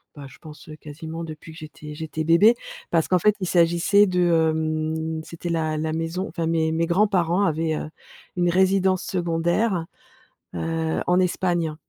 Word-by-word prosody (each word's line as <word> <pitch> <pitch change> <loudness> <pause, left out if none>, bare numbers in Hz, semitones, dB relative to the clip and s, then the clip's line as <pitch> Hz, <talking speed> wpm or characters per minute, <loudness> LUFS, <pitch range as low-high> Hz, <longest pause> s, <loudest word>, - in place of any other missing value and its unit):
bah, 145 - -9
je 135 - -16
pense, 155 -1 -13
heu, 155 - -8
quasiment, 160 +2 -8
depuis 160 0 -9
que - - -14
j'étais 150 -1 -10
j'étais 155 0 -4
bébé. 195 +9 +5 0.3
Parce 165 -2 +1
qu'en 180 -1 +2
fait, 210 +3 +3
il 185 - -3
s'agissait 175 +4 +4
de, 180 -1 0 0.3
hem, 160 0 -2
c'était 170 +1 -7
la 160 -2 -1
la 155 0 -2
maison, 165 +4 -3
enfin, 165 0 -3
mes 160 -1 +1
mes 165 +1 0
grands-parents 185 -1 +2
avaient, 160 0 0
heu, 155 - -5 0.5
une 175 -1 +1
résidence 190 0 +2
secondaire, 175 +1 0 0.7
heu 160 0 -2
en 180 +1 +3
Espagne 175 -3 0
165 Hz, 165 wpm, -23 LUFS, 160-180 Hz, 0.7 s, bébé